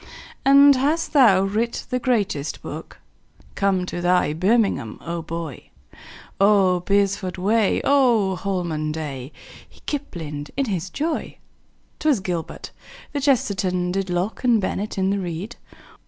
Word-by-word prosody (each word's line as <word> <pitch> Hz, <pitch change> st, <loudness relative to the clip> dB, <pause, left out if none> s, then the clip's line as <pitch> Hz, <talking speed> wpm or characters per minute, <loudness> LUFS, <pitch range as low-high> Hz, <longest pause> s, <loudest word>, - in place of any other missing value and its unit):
"And 280 Hz, 0 st, +7 dB
hast 300 Hz, +6 st, 0 dB
thou 220 Hz, -10 st, +6 dB
writ 220 Hz, +4 st, -2 dB
the 250 Hz, -, 0 dB
greatest 205 Hz, -, -1 dB
book? -, -, -8 dB, 0.6 s
Come 195 Hz, -2 st, +1 dB
to 175 Hz, -, -5 dB
thy 175 Hz, -3 st, +2 dB
birmingham, 190 Hz, -, +1 dB
my 170 Hz, +1 st, -5 dB
boy! 165 Hz, -3 st, -7 dB, 0.7 s
Oh, 195 Hz, -3 st, +4 dB
beresford 195 Hz, 0 st, 0 dB
way! 210 Hz, +3 st, +2 dB
Oh, 240 Hz, -9 st, +3 dB
holman 170 Hz, -5 st, -2 dB
day!" 145 Hz, -4 st, -6 dB, 0.4 s
He -, -, -21 dB
kiplinged 160 Hz, -, -5 dB
in 275 Hz, -, +1 dB
his 185 Hz, -5 st, -3 dB
joy. 310 Hz, -, -3 dB, 0.6 s
'Twas 300 Hz, -7 st, +2 dB
gilbert. 175 Hz, -3 st, -5 dB, 0.4 s
The 290 Hz, -, -1 dB
kchesterton 190 Hz, -9 st, +1 dB
Did 195 Hz, 0 st, -2 dB
locke 180 Hz, +7 st, -2 dB
and 240 Hz, -3 st, +4 dB
bennett 205 Hz, +1 st, -3 dB
in 190 Hz, 0 st, +1 dB
the 200 Hz, -, 0 dB
reed. 185 Hz, +5 st, -5 dB
195 Hz, 130 wpm, -22 LUFS, 175-235 Hz, 0.7 s, And